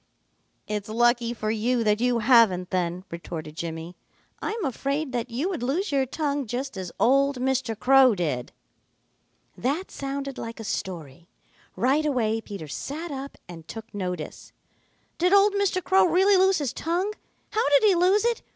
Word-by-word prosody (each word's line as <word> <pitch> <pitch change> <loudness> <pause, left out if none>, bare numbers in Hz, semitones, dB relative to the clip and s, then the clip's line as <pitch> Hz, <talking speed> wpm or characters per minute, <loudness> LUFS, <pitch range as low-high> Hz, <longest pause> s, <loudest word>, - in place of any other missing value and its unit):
"It's 210 0 -4
lucky 240 +1 +2
for 215 -2 -2
you 230 +2 0
that 210 0 +2
you 245 -1 +2
haven't 220 -6 +4
then," 180 -1 -1
retorted 165 -2 -7
Jimmy. 165 +1 -6 0.5
"I'm 430 -3 -3
afraid 275 +3 -2
that 245 -1 -3
you 255 +9 -2
would 355 -9 -4
lose 310 +10 -1
your 270 -2 +1
tongue 285 -1 -2
just 260 +3 -4
as 185 -2 -5
old 275 +2 +3
Mr. 255 -3 -1
Crow 260 -1 +5
did." 150 -9 -2 1.0
That 290 +10 -2
sounded 275 0 -5
like 230 0 -7
a - - -6
story. 170 -7 -5 0.5
Right 275 +5 +2
away 225 -5 0
Peter 200 -8 -8
sat 305 - -5
up 275 0 -6
and 165 -2 -11
took 225 0 -9
notice. 180 -5 -5 0.7
"Did 360 +3 +3
old 400 +1 +6
Mr. 400 -2 0
Crow 380 0 +4
really 380 +4 +4
lose 380 0 +4
his 285 -5 -2
tongue? 360 +6 -1 0.4
How 435 -9 +1
did 285 +4 +5
he 415 -2 +6
lose 370 +5 +3
it? 475 -1 +1
250 Hz, 160 wpm, -25 LUFS, 210-310 Hz, 1.0 s, old